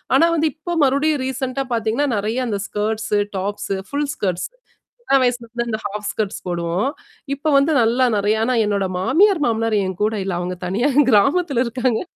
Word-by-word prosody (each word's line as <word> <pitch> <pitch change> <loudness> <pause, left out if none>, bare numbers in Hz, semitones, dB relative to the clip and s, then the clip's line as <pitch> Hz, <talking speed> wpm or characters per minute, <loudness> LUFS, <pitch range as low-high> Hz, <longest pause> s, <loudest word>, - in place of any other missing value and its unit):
ஆனா 330 - +6
வந்து 315 0 +2
இப்போ 345 +3 -5
மறுபடியும் 280 +1 +1
ரீசென்ட்டா 265 +1 -3
பார்த்தீங்கன்னா, 230 +5 0
நெறைய 220 +5 -1
அந்த 205 -3 -2
ஸ்கர்ட்ஸ், 215 +1 -2 0.2
டாப்ஸ, 205 +2 -3 0.2
ஃபுல் 285 0 -2
ஸ்கர்ட்ஸ். 185 -3 -2 0.5
சின்ன 275 -12 +3
வயசுலருந்து 235 -1 -2
இந்த 220 -1 -2
ஹாஃப் 210 0 -4
ஸ்க்ட்ஸ் 210 -3 -3
போடுவோம். 175 +6 -1 0.5
இப்ப 305 +2 -1
வந்து 280 +3 +3
நல்லா 240 +3 +3
நிறைய. 205 +2 +2
ஆனா 255 - +1
என்னோட 200 -2 0
மாமியார், 325 - +3
மாமினார் 225 -1 0
என் 185 -1 -4
கூட 220 +1 +1
இல்ல. 195 - -3
அவங்க 180 +1 -3
தனியா 200 +9 0 0.2
கிராமத்துல 275 - +3
இருக்காங்க. 245 -1 0
230 Hz, 165 wpm, -20 LUFS, 205-275 Hz, 0.5 s, ஆனா